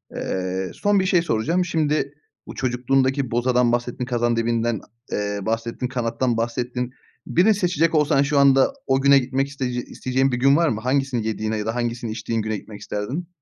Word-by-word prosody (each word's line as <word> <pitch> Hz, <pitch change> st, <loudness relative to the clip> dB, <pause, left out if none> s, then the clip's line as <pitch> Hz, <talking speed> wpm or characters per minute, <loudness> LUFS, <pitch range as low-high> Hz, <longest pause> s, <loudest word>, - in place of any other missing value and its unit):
Eee, 95 Hz, 0 st, -3 dB
son 205 Hz, -1 st, +2 dB
bir 185 Hz, -, +1 dB
şey 180 Hz, -2 st, +3 dB
soracağım, 165 Hz, +6 st, 0 dB
şimdi 155 Hz, -4 st, 0 dB, 0.3 s
bu -, -, -8 dB
çocukluğundaki 130 Hz, +1 st, 0 dB
bozadan 120 Hz, 0 st, +2 dB
bahsettin, 120 Hz, +1 st, -2 dB
kazandibinden, 120 Hz, -2 st, 0 dB, 0.3 s
eee, 105 Hz, 0 st, -2 dB
bahsettin, 115 Hz, +4 st, -2 dB
kanattan 120 Hz, -1 st, -1 dB
bahsettin. 120 Hz, +2 st, -2 dB, 0.3 s
Birini 195 Hz, +6 st, +4 dB
seçecek 170 Hz, -4 st, +1 dB
olsan 150 Hz, -2 st, +3 dB
şu 145 Hz, 0 st, +2 dB
anda 135 Hz, -, +5 dB
o 135 Hz, 0 st, +2 dB
güne 140 Hz, 0 st, +6 dB
gitmek 135 Hz, +2 st, -1 dB
isteyece 125 Hz, -3 st, -3 dB
isteyeceğin 130 Hz, +1 st, -1 dB
bir 125 Hz, -, 0 dB
gün 135 Hz, +3 st, +4 dB
var 170 Hz, -2 st, +3 dB
mı? 110 Hz, -, -2 dB
Hangisini 130 Hz, -3 st, 0 dB
yediğine 110 Hz, 0 st, -2 dB
ya 105 Hz, -, -3 dB
da 110 Hz, +1 st, -2 dB
hangisini 120 Hz, -2 st, -2 dB
içtiğin 110 Hz, +1 st, -2 dB
güne 110 Hz, 0 st, -2 dB
gitmek 105 Hz, +1 st, -11 dB
isterdin? 125 Hz, +12 st, -4 dB
125 Hz, 170 wpm, -22 LUFS, 115-140 Hz, 0.3 s, güne